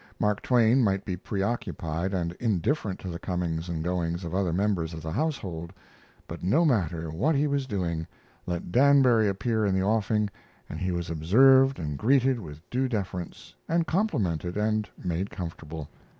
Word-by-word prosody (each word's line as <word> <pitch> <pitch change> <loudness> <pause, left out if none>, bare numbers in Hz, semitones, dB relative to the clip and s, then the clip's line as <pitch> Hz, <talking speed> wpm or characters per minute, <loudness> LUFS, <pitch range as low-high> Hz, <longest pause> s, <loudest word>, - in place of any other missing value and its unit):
Mark 105 -1 +1
Twain 120 +1 +4
might 100 -2 +1
be 90 - -2
preoccupied 95 -4 -2
and 85 -3 -1
indifferent 110 - 0
to - - -7
the 85 -1 -5
comings 90 -3 -2
and 80 -2 -3
goings 85 0 -1
of 85 -1 -5
other 95 -2 +1
members 90 -3 0
of 80 - -8
the 80 - -4
household; 95 - -3 0.6
but 85 - -7
no 140 - +3
matter 85 - 0
what 130 - +1
he 140 +2 +2
was 140 -2 0
doing, 85 -7 -2 0.4
let 85 -1 -3
Danbury 130 -3 +5
appear 110 +3 0
in 100 -2 +2
the 95 - +1
offing 105 0 +1 0.4
and 80 - -6
he 90 0 -1
was 85 -1 -3
observed 130 - +5
and 75 -4 -4
greeted 130 +1 +3
with 80 -4 -10
due 130 +2 +1
deference, 95 -6 -5 0.2
and 170 0 +2
complimented 100 - -1
and 110 0 0
made 90 +2 -2
comfortable. 80 -4 -7
95 Hz, 165 wpm, -27 LUFS, 85-120 Hz, 0.6 s, Danbury